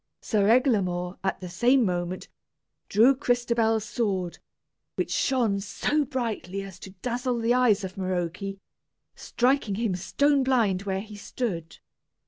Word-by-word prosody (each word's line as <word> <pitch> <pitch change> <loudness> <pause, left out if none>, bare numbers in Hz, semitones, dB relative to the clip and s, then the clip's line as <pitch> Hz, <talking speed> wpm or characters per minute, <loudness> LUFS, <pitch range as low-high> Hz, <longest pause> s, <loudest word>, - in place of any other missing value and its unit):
Sir 205 -2 +1
Eglamour, 195 -8 +2
at 190 0 -1
the 180 - -5
same 240 +8 +3
moment, 180 0 -2 0.6
drew 230 +7 +6
Crystabell's 235 -4 +1
sword, 195 -7 -2 0.6
which - - -2
shone 235 -7 +1
so 290 +9 0
brightly 225 -7 -3
as 190 -2 -10
to 190 0 -11
dazzle 245 0 -1
the 230 +1 +2
eyes 235 -5 +3
of 190 +1 -6
Maroke, 180 -2 -2 0.7
striking 245 -5 0
him 220 -2 0
stone 280 +10 +2
blind 225 -8 +2
where 190 0 -1
he 210 0 -10
stood. 200 -6 -4
215 Hz, 130 wpm, -26 LUFS, 190-245 Hz, 0.7 s, drew